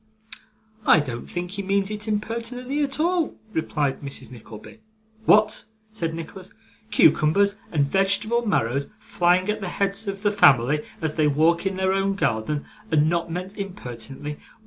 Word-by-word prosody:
'I 160 Hz, -, +7 dB
don't 120 Hz, -4 st, -6 dB
think 175 Hz, 0 st, -4 dB
he 200 Hz, 0 st, -4 dB
means 195 Hz, +1 st, 0 dB
it 210 Hz, +1 st, -5 dB
impertinently 235 Hz, +6 st, -2 dB
at 275 Hz, 0 st, -3 dB
all,' 340 Hz, 0 st, +1 dB, 0.2 s
replied 150 Hz, -4 st, -1 dB
Mrs. 135 Hz, -4 st, -7 dB
Nickleby. 110 Hz, -, -12 dB, 0.5 s
'What!' 215 Hz, 0 st, +4 dB, 0.3 s
said 165 Hz, -7 st, -3 dB
Nicholas, 175 Hz, +3 st, -8 dB, 0.4 s
'cucumbers 200 Hz, +5 st, +4 dB
and 150 Hz, -4 st, +2 dB
vegetable 200 Hz, +8 st, +1 dB
marrows 140 Hz, -, 0 dB
flying 180 Hz, -1 st, +1 dB
at 210 Hz, 0 st, -1 dB
the 195 Hz, -, -3 dB
heads 200 Hz, +3 st, 0 dB
of 195 Hz, +1 st, -4 dB
the 205 Hz, -, +3 dB
family 140 Hz, -, +4 dB, 0.2 s
as 160 Hz, -1 st, 0 dB
they 155 Hz, -1 st, +4 dB
walk 165 Hz, +5 st, +2 dB
in 195 Hz, -, -2 dB
their 190 Hz, 0 st, +1 dB
own 195 Hz, 0 st, +1 dB
garden, 145 Hz, -, -1 dB, 0.2 s
and 155 Hz, 0 st, +3 dB
not 170 Hz, -1 st, -1 dB
meant 185 Hz, +4 st, -5 dB
impertinently! 145 Hz, -, -6 dB
185 Hz, 150 wpm, -24 LUFS, 150-205 Hz, 0.5 s, I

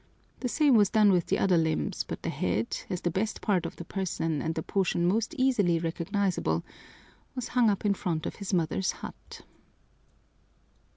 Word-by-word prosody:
The 250 Hz, -, -2 dB
same 290 Hz, +1 st, +3 dB
was 205 Hz, -4 st, +5 dB
done 215 Hz, -3 st, +5 dB
with 180 Hz, -3 st, +2 dB
the -, -, +1 dB
other 185 Hz, -3 st, +3 dB
limbs, 160 Hz, -1 st, 0 dB
but -, -, -7 dB
the -, -, -1 dB
head, 100 Hz, +6 st, -1 dB
as 180 Hz, -, -3 dB
the 175 Hz, -, 0 dB
best 200 Hz, +6 st, -1 dB
part 185 Hz, -5 st, +1 dB
of -, -, -9 dB
the 170 Hz, -, -8 dB
person 165 Hz, -5 st, -2 dB
and 160 Hz, 0 st, -2 dB
the 160 Hz, -, -2 dB
portion 180 Hz, -3 st, 0 dB
most 225 Hz, -, +1 dB
easily 240 Hz, -, +3 dB
recognizable, 170 Hz, -, -1 dB, 0.7 s
was 255 Hz, -3 st, -4 dB
hung 245 Hz, -3 st, +4 dB
up 200 Hz, 0 st, -1 dB
in 205 Hz, -, +4 dB
front 165 Hz, -5 st, -2 dB
of -, -, -5 dB
his 200 Hz, -1 st, -5 dB
mother's 180 Hz, +1 st, +1 dB
hut!" -, -, -10 dB
185 Hz, 180 wpm, -28 LUFS, 165-210 Hz, 0.7 s, was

